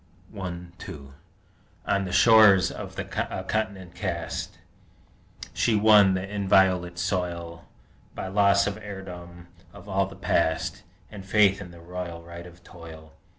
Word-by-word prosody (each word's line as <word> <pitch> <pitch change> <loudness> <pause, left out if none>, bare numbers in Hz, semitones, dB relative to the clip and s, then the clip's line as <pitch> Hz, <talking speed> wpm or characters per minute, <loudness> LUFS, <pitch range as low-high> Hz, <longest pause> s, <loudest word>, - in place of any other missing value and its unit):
I 90 -3 -5 0.2
2 70 -2 -10 0.7
On 100 -1 0
the 90 - -5
shores 105 -2 +6
of - - -8
a - - -2 0.4
Continent 95 -5 -3
cast, - - -4 1.0
She 115 - +1
won 105 -2 +6
the 95 +1 -3
inviolate 95 -3 +2
soil 85 -2 -3 0.5
By - - -5
loss 100 0 +3
of 100 0 -3
heirdom 90 -4 -10 0.2
of 100 0 -14
all 95 -1 0
the 95 - -11
Past, 85 -4 0 0.3
And 100 -2 -9
faith 100 0 +3
in 90 - -9
the 85 -1 -14
royal 85 -1 -7
right 85 +1 -10
of 85 0 -17
Toil! 80 -2 -13
95 Hz, 135 wpm, -26 LUFS, 85-100 Hz, 1.0 s, shores